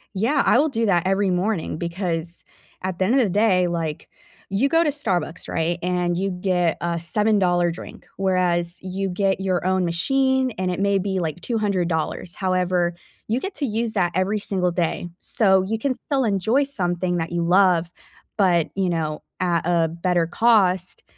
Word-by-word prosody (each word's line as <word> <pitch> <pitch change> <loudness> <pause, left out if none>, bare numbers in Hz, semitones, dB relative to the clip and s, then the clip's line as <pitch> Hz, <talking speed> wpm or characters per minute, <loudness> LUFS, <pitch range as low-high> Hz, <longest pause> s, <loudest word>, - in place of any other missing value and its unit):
Yeah, 255 +9 +2
I - - +5
will 305 +4 +3
do 230 -4 -1
that 175 -3 +3
every 195 0 +2
morning 180 -2 -1
because 170 -1 -4 0.4
at 185 -1 -3
the 185 - +1
end 235 +7 +2
of 270 - +5
the 210 - +1
day, 190 -2 +3
like, 165 -3 -4 0.4
you 225 +8 +2
go 330 +3 +3
to 300 - +1
Starbucks, 185 - -2
right, 165 +1 -1
and 180 -1 0
you 195 +1 -1
get 180 -2 0
a 170 -1 -1
seven-dollar 180 -2 +2
drink, 170 - -9
whereas 180 -2 0
you 190 +1 -3
get 195 +1 0
your 185 -2 -1
own 185 0 +1
machine, 265 +9 +1
and 185 0 -1
it 180 - -3
may 200 0 +2
be, 190 0 -1
like, 165 0 -3
$200. 180 -6 -1
However, 180 -2 0 0.3
you 230 +4 0
get 390 +5 -5
to 285 - -1
use 225 +1 -1
that 175 -4 +1
every 195 +3 +1
single 185 -3 -1
day. 175 0 -1
So, 190 -4 +2
you 220 +4 -2
can 260 +3 -1
still 270 0 -2
enjoy 220 +6 +2
something 180 -9 -1
that 165 0 -3
you 170 -1 -1
love, 175 -1 +3 0.5
but, 175 -5 +3
you 190 -2 0
know, 155 -2 -2 0.2
at 175 -2 +1
a 170 -2 +2
better 170 0 0
cost 185 -1 +2
185 Hz, 180 wpm, -22 LUFS, 175-205 Hz, 0.5 s, I